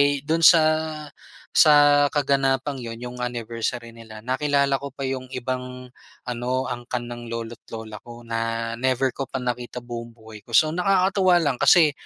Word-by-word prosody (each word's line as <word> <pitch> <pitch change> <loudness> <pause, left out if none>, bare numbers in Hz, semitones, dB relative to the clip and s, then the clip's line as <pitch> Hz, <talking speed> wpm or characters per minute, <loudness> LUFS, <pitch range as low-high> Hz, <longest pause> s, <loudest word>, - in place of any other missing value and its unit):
eh, 140 -1 +3
do'n 165 +2 +1
sa 165 -1 +8 0.9
sa 145 -2 +6
kaganapang 135 -1 0
yun 115 -1 -6
yung 125 +1 -8
anniversary 115 0 -4
nila 110 -1 -12
nakilala 140 +1 +1
ko 140 - -5
pa 135 0 -7
yung 130 -1 -4
ibang 125 0 -5 0.3
ano, 125 +1 -2
angkan 120 0 -4
ng 120 0 -8
lolo't 115 0 -6
lola 110 -2 -8
ko 120 0 -12
na 115 0 -3
never 130 0 +1
ko 135 - -5
pa - - -5
nakita 125 -1 -4
buong 120 -1 -8
buhay 110 -1 -13
ko. 115 +1 -1
So, 155 0 +4
nakakatuwa 185 0 +3
lang 140 -4 0
kasi 150 +2 +6
125 Hz, 160 wpm, -23 LUFS, 115-140 Hz, 0.9 s, sa